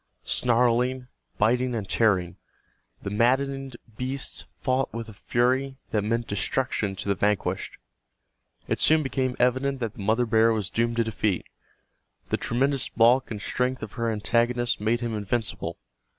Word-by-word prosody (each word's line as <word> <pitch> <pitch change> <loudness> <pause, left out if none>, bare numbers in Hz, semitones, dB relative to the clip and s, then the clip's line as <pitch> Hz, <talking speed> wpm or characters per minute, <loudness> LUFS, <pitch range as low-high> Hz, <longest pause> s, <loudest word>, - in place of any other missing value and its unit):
Snarling, 125 +1 +2 0.3
biting 125 +3 +2
and 105 -4 -3
tearing, 95 -4 +2 0.7
the 100 - -4
maddened 135 +3 +1 0.2
beasts 130 +2 -4
fought 130 0 0
with 115 0 -5
a - - -10
fury 130 +6 0
that 105 -2 +1
meant 115 +2 0
destruction 105 -1 -1
to 95 - -6
the 100 - +3
vanquished. 105 0 -1 0.9
It - - -1
soon 155 +1 +4
became 130 -2 -1
evident 130 +2 +1
that 115 -4 -3
the - - -9
mother 110 +5 +2
bear 115 0 +4
was 105 -4 -2
doomed 115 0 0
to 115 - +2
defeat. 105 -4 -1 0.8
The - - +1
tremendous 135 +3 0
bulk 120 +3 +4
and 110 -3 -5
strength 125 +4 -1
of - - -6
her 115 -1 -1
antagonist 120 +2 +1
made 115 +3 +1
him 115 -2 -2
invincible. 105 +1 -2
120 Hz, 150 wpm, -26 LUFS, 110-130 Hz, 0.9 s, soon